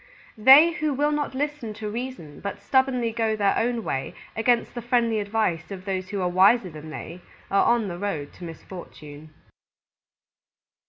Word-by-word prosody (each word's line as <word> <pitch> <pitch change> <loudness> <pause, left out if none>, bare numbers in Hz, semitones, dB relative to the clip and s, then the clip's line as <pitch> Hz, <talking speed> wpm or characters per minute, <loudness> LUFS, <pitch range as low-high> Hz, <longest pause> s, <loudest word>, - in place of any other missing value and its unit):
_They 280 +9 +8
who 305 -4 -1
will 295 +2 +1
not 295 -3 -2
listen 285 -6 -3
to 215 0 -6
reason 225 - -6
but 200 0 -5
stubbornly 250 +1 +1
go 225 -1 0
their 200 -2 +2
own 235 0 0
way 135 -7 -3 0.2
against 235 +1 +1
the 240 - -5
friendly 235 -2 +1
advice 200 -5 -1
of 190 -2 -8
those 185 -2 -3
who 200 -2 -3
are - - +1
wiser 190 +2 +4
than 155 0 -10
they, 170 +3 -8 0.3
are 195 - +3
on 235 -3 +2
the 175 -2 -6
road 165 -8 -4
to - - -13
misfortune. 155 -3 -10
215 Hz, 165 wpm, -25 LUFS, 180-245 Hz, 0.3 s, They